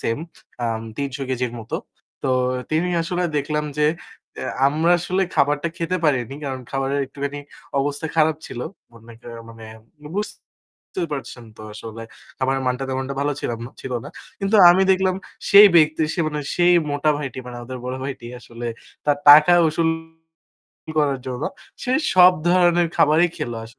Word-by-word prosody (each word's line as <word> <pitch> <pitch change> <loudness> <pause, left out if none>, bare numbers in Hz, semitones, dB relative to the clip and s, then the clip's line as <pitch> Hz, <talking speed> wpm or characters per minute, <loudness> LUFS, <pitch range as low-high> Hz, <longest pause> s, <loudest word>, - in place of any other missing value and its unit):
same 115 +7 -2 0.4
আম 115 -1 -1 0.2
৩০০ 140 -1 -4
কেজির 125 -2 -2
মতো। 110 - -4 0.5
তো - - -1 0.4
তিনি 165 +3 +1
আসলে 175 +2 -2
দেখলাম 150 +1 -1
যে 150 - +4 0.5
এ্যা - - -4 0.2
আমরা 160 +5 +2
আসলে 185 +2 -1
খাবারটা 145 +3 +1
খেতে 170 +2 -1
পারিনি। 135 -3 +1
কারণ 130 -2 -4
খাবারের 135 +1 -1
একটুখানি 140 +1 -5 0.4
অবস্থা 145 +3 -2
খারাপ 155 0 +3
ছিল। 120 - -7 0.3
মনে 115 0 -15
করেন 115 -1 -9
মানে 115 -1 -12 0.5
বুঝতে 210 -2 -8
পারছেন 130 -3 -6
তো - - -11
আসলে 115 +1 -8 0.4
খাবারের 135 0 0
মানটা 125 +1 -1
তেমনটা 130 +1 -3
ভালো 145 +1 0
ছিলাম 115 -1 -3
না, - - -11
ছিল 130 - -6
না। - - -7 0.3
কিন্তু 195 +2 +2
আমি 185 +2 +4
দেখলাম 190 0 +1 0.4
সেই 205 +1 +10
ব্যক্তি, 155 -1 +4
সে 175 - -1
মানে 150 -1 -4
সেই 175 0 +4 0.2
মোটা 145 +2 +1
ভাইটি 135 -3 -6
মানে 125 -1 -8
আমাদের 125 +1 -7
বড় 125 +1 -3
ভাইটি 135 -3 -6
আসলে 120 0 -8 0.4
তার 145 -1 +2
টাকা 150 +4 +9 0.2
উসুল 160 +1 0 1.1
করার 140 -3 +2
জন্য 130 +1 -4 0.4
সে 250 - -1 0.2
সব 180 0 +8 0.2
ধরনের 175 -1 +4
খাবারই 155 +4 +4
খেল 120 - -3
আস - - -7
145 Hz, 160 wpm, -22 LUFS, 130-165 Hz, 1.1 s, সেই